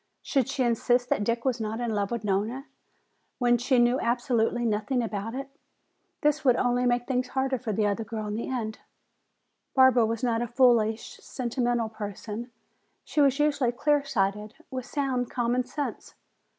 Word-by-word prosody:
Should 270 Hz, -5 st, +1 dB
she 260 Hz, -, 0 dB
insist 245 Hz, +1 st, +1 dB
that 205 Hz, -, +1 dB
Dick 235 Hz, +3 st, -1 dB
was 255 Hz, -3 st, 0 dB
not 220 Hz, +1 st, -3 dB
in 240 Hz, -2 st, -1 dB
love 200 Hz, -1 st, 0 dB
with 235 Hz, -2 st, -3 dB
Nona 210 Hz, +7 st, -1 dB, 0.7 s
when 240 Hz, -1 st, +3 dB
she 255 Hz, +2 st, +2 dB
knew 240 Hz, +2 st, +4 dB
absolutely 240 Hz, 0 st, +1 dB
nothing 220 Hz, +3 st, 0 dB
about 220 Hz, +1 st, -4 dB
it? 275 Hz, +1 st, -4 dB, 0.7 s
This 300 Hz, 0 st, +2 dB
would, 255 Hz, -3 st, +5 dB
only 245 Hz, 0 st, +1 dB
make 245 Hz, 0 st, +1 dB
things 250 Hz, -1 st, -1 dB
harder 265 Hz, 0 st, -1 dB
for 225 Hz, -3 st, -3 dB
the 210 Hz, +1 st, +1 dB
other 205 Hz, +2 st, 0 dB
girl 220 Hz, 0 st, -5 dB
in 210 Hz, -, -3 dB
the 225 Hz, -, -3 dB
end. 225 Hz, -4 st, -3 dB, 1.0 s
Barbara 260 Hz, -4 st, +6 dB
was 230 Hz, +2 st, -3 dB
not 235 Hz, -2 st, +1 dB
a 240 Hz, -, -1 dB
foolish, 235 Hz, -3 st, +2 dB
sentimental 240 Hz, -2 st, -1 dB
person; 215 Hz, +2 st, -6 dB, 0.6 s
she 300 Hz, -, +1 dB
was 275 Hz, -1 st, +4 dB
usually 290 Hz, -5 st, +2 dB
clear 290 Hz, +3 st, +1 dB
sighted, 210 Hz, -3 st, -1 dB, 0.2 s
with 255 Hz, -1 st, -5 dB
sound 260 Hz, -4 st, -1 dB
common 245 Hz, +1 st, 0 dB
sense. 285 Hz, +3 st, -5 dB
240 Hz, 170 wpm, -27 LUFS, 220-255 Hz, 1.0 s, Barbara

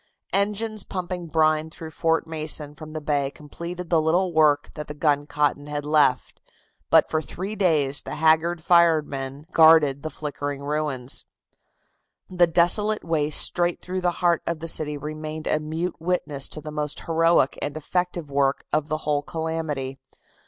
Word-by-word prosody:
Engines 210 Hz, +1 st, 0 dB
pumping 180 Hz, -2 st, -5 dB
brine 155 Hz, 0 st, +2 dB
through 160 Hz, 0 st, -9 dB
Fort 165 Hz, +1 st, 0 dB
Mason 155 Hz, -2 st, -2 dB
from 155 Hz, 0 st, -11 dB
the 155 Hz, -, -3 dB
bay 145 Hz, -2 st, 0 dB
completed 170 Hz, +5 st, -8 dB
the 165 Hz, -2 st, +4 dB
little 175 Hz, +3 st, +1 dB
work 150 Hz, -2 st, +3 dB
that 150 Hz, -1 st, -7 dB
the 150 Hz, -, -7 dB
guncotton 145 Hz, -1 st, 0 dB
had 145 Hz, 0 st, -4 dB
left, 150 Hz, -3 st, +2 dB, 0.5 s
but -, -, +5 dB
for 155 Hz, -, -1 dB
three 185 Hz, -, -6 dB
days 150 Hz, -8 st, +1 dB
the -, -, -6 dB
haggard 160 Hz, +2 st, +3 dB
eyed -, -, -20 dB
firemen 150 Hz, -5 st, +2 dB
guarded 160 Hz, -4 st, +6 dB
the 155 Hz, -, -4 dB
flickering 145 Hz, -2 st, -5 dB
ruins. 140 Hz, -3 st, -2 dB, 1.1 s
The 180 Hz, -1 st, +4 dB
desolate 205 Hz, +6 st, +2 dB
waste 155 Hz, -3 st, +1 dB
straight 175 Hz, -1 st, +1 dB
through 185 Hz, +1 st, -4 dB
the 180 Hz, -, +2 dB, 0.2 s
heart 170 Hz, -1 st, +3 dB
of 170 Hz, -2 st, -2 dB
the 165 Hz, -, -5 dB
city 150 Hz, -2 st, +2 dB
remained 155 Hz, +1 st, -6 dB
a 155 Hz, -, +1 dB
mute 160 Hz, +4 st, -4 dB
witness 160 Hz, -5 st, -1 dB
to 155 Hz, -, -7 dB
the 155 Hz, 0 st, -7 dB
most 150 Hz, -1 st, -3 dB
heroic 165 Hz, -4 st, +2 dB
and 145 Hz, +1 st, -3 dB
effective 175 Hz, -1 st, -2 dB
work 140 Hz, 0 st, +1 dB
of 155 Hz, -1 st, +1 dB
the 155 Hz, -, -1 dB
whole 145 Hz, -1 st, +1 dB
calamity. 155 Hz, -4 st, -4 dB
155 Hz, 160 wpm, -24 LUFS, 145-170 Hz, 1.1 s, guarded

